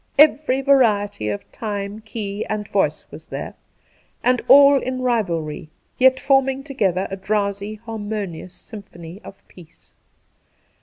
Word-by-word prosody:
Every 290 -2 +4
variety 210 - +2
of 100 - -6
time, 205 -1 -5
key, 210 -2 -5
and 210 -1 -3
voice 155 -7 0
was 150 +2 -12
there,, - - -6 0.7
and 250 0 +2
all 280 0 +7
in 255 0 -3
rivalry, 170 -11 -1 0.3
yet 260 0 +5
forming 270 -1 +2
together 195 - -1
a - - -2
drowsy 200 +1 -2
harmonious 210 -5 -6
symphony 190 -4 -11
of 195 - -14
peace. 170 -2 -18
210 Hz, 120 wpm, -21 LUFS, 195-255 Hz, 0.7 s, all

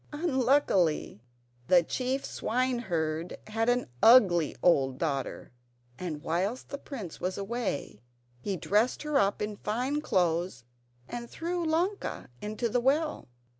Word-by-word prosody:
Unluckily 260 - +2 0.5
the 180 -2 +6
chief 260 +8 -2
swineherd 180 -10 -1
had 225 +2 0
an 245 0 +1
ugly 185 - +6
old 135 -7 +3
daughter, 140 -4 -3 0.5
and 160 -4 -5
whilst 185 +9 -1
the 280 - -5
prince 220 - -8
was 185 +1 -2
away 200 - -3 0.4
he 195 +8 -3
dressed 210 - +1
her 300 -2 +2
up 200 +1 +1
in 210 -1 -4
fine 250 +9 -1
clothes, 175 - 0 0.4
and 235 -1 -6
threw 345 +1 -3
Ilonka 345 - -1
into 215 +3 -2
the 240 +2 0
well. 295 - +1
215 Hz, 125 wpm, -29 LUFS, 175-260 Hz, 0.5 s, the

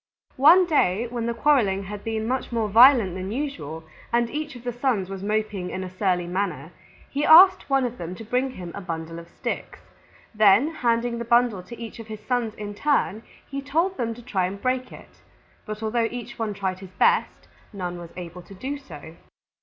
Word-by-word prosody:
One 330 +7 +7
day 235 - +2
when 235 -1 -3
the 235 - 0
quarreling 230 -9 +2
had 205 +1 -7
been 220 -1 -2
much 255 +1 -2
more 230 -2 0
violent 230 -2 +6
than 185 +2 -5
usual 165 - -4 0.3
and 235 0 +1
each 300 -2 -4
of 240 - -11
the 245 -1 -3
Sons 235 -7 -1
was 195 -1 -6
moping 210 -3 -2
in 185 - -4
a 185 - -7
surly 185 -3 +1
manner, 175 -4 -3 0.4
he 285 +1 -1
asked 370 +4 +7
one 270 -1 +3
of 245 0 -5
them 175 +1 -5
to 225 - -9
bring 250 +4 0
him 180 -9 -8
a 200 - -6
bundle 165 -2 -5
of 170 0 -13
sticks. - - -5 0.6
Then 215 +8 +5
handing 235 -3 0
the - - -3
bundle 235 -4 +2
to 235 +6 -11
each 230 0 -8
of 225 - -9
his 215 -1 -7
Sons 235 -1 -1
in 205 -1 -6
turn 225 -3 0 0.3
he 275 0 -5
told 330 +7 0
them 230 -2 -2
to 240 - -13
try 190 -7 -1
to 195 - -6
break 255 +4 -2
it. - - -15 0.5
But 215 +1 -6
although 225 +1 +1
each 240 -1 -8
one 215 -2 -2
tried 190 -2 -3
his 190 -1 -12
best, 185 - +1 0.2
none 180 -4 -5
was 170 -1 -9
able 180 0 -8
to 195 +2 -14
do 275 +8 -5
so. 160 - -12
225 Hz, 205 wpm, -24 LUFS, 190-250 Hz, 0.6 s, One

